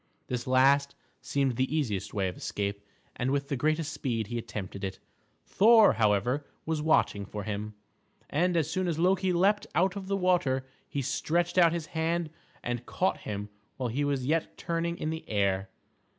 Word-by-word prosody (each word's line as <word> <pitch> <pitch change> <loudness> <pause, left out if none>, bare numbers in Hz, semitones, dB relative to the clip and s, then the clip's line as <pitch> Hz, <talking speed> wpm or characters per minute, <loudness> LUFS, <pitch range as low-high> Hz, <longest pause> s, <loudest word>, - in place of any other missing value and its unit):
This 125 -1 -4
last 140 +2 +4 0.3
seemed 135 -4 0
the 130 +3 0
easiest 105 -11 -1
way 100 -2 0
of 90 - -4
escape, 100 0 -3 0.3
and 125 - 0
with 140 0 -1
the 140 - 0
greatest 155 +3 0
speed 115 -5 -2
he 120 +3 -3
attempted 100 -3 -6
it. 95 -1 -3 0.5
Thor, 220 +1 +6
however, 110 +5 +2 0.2
was 160 -1 -1
watching 150 -9 +2
for 105 +1 -6
him, 105 0 -4 0.5
and 175 +4 +1
as 160 -3 +2
soon 185 +3 -1
as 165 -3 -1
Loki 185 +2 +2
leaped 195 +4 +2
out 185 +4 +2
of 195 -2 -6
the 195 0 0
water 175 -9 +2 0.2
he 140 - -2
stretched 175 +7 0
out 170 -2 +6
his 170 -2 -3
hand 165 0 -1 0.3
and 120 0 -3
caught 185 - 0
him 105 0 -4 0.3
while 125 -2 -2
he 135 +6 -1
was 140 -3 0
yet 160 +3 0
turning 170 0 -2
in 155 - -2
the 160 0 -5
air. 100 -2 +1
140 Hz, 180 wpm, -29 LUFS, 110-170 Hz, 0.5 s, Thor